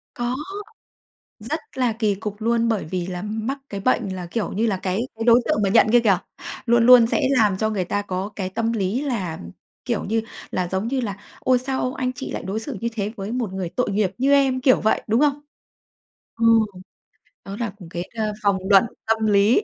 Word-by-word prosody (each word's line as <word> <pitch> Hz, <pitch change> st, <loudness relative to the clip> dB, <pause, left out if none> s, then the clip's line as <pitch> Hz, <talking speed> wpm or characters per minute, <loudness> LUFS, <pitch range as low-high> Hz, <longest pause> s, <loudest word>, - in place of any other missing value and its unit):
Có, 240 Hz, +1 st, -2 dB, 1.0 s
rất -, -, -4 dB, 0.2 s
là 250 Hz, -3 st, +1 dB
kỳ 215 Hz, -2 st, 0 dB
cục 210 Hz, +1 st, -6 dB
luôn 230 Hz, +1 st, +1 dB
bởi 220 Hz, -3 st, 0 dB
vì 175 Hz, +2 st, -3 dB
là 180 Hz, 0 st, -5 dB
mắc 220 Hz, +6 st, -3 dB
cái 200 Hz, -1 st, -5 dB
bệnh 240 Hz, -1 st, +1 dB
là, 180 Hz, -1 st, -6 dB
kiểu 210 Hz, +5 st, -3 dB
như 220 Hz, +4 st, 0 dB
là, 205 Hz, -4 st, +1 dB
cái 185 Hz, +2 st, -2 dB
cái 225 Hz, 0 st, -4 dB
đối 240 Hz, +1 st, +6 dB
tượng -, -, +1 dB
mà 195 Hz, -, +2 dB
nhận 190 Hz, -, +5 dB
kia 240 Hz, -, +7 dB
kìa, 205 Hz, -5 st, +3 dB, 0.5 s
luôn 235 Hz, 0 st, +4 dB
luôn 250 Hz, -2 st, +9 dB
sẽ -, -, 0 dB
làm 215 Hz, -7 st, +3 dB
cho 220 Hz, 0 st, 0 dB
người 200 Hz, -4 st, -1 dB
ta 205 Hz, +3 st, -1 dB
có 190 Hz, 0 st, -3 dB
cái 190 Hz, -2 st, -2 dB
tâm 225 Hz, +4 st, -1 dB
lý 215 Hz, +4 st, -1 dB
là, 215 Hz, -, -2 dB
ừm, 85 Hz, -, -9 dB, 0.3 s
kiểu -, -, -1 dB
như 225 Hz, +2 st, 0 dB, 0.3 s
là, 180 Hz, -1 st, -1 dB
giống 190 Hz, +5 st, -2 dB
như 265 Hz, +1 st, 0 dB
là 205 Hz, -6 st, -3 dB, 0.2 s
"Ôi, 255 Hz, -1 st, +3 dB
sao 260 Hz, 0 st, -2 dB
anh 255 Hz, -1 st, -2 dB
chị 255 Hz, +1 st, -6 dB
lại -, -, -4 dB
đối 205 Hz, +3 st, -3 dB
xử 235 Hz, 0 st, -6 dB
như 235 Hz, -, -1 dB
thế 210 Hz, -1 st, -2 dB
với 200 Hz, +2 st, -5 dB
một 240 Hz, -6 st, -2 dB
người 190 Hz, -2 st, -3 dB
tội 250 Hz, -4 st, +1 dB
nghiệp 200 Hz, -2 st, +1 dB
như 275 Hz, +2 st, +3 dB
em?", 270 Hz, -2 st, +3 dB
kiểu 255 Hz, 0 st, +4 dB
vậy, 220 Hz, -, +1 dB
đúng 225 Hz, +3 st, +2 dB
không? 290 Hz, -1 st, +2 dB, 1.0 s
Ờ, 230 Hz, -, 0 dB, 1.0 s
đó 195 Hz, -, -6 dB
là 235 Hz, -2 st, -1 dB
cũng 180 Hz, -5 st, -12 dB
cái, 175 Hz, 0 st, -4 dB
ờ, 215 Hz, -1 st, -1 dB
vòng 200 Hz, -1 st, +3 dB
luẩn 195 Hz, -2 st, +7 dB, 0.2 s
tâm 220 Hz, 0 st, +1 dB
lý. 205 Hz, -, +4 dB
220 Hz, 225 wpm, -22 LUFS, 195-240 Hz, 1.0 s, luôn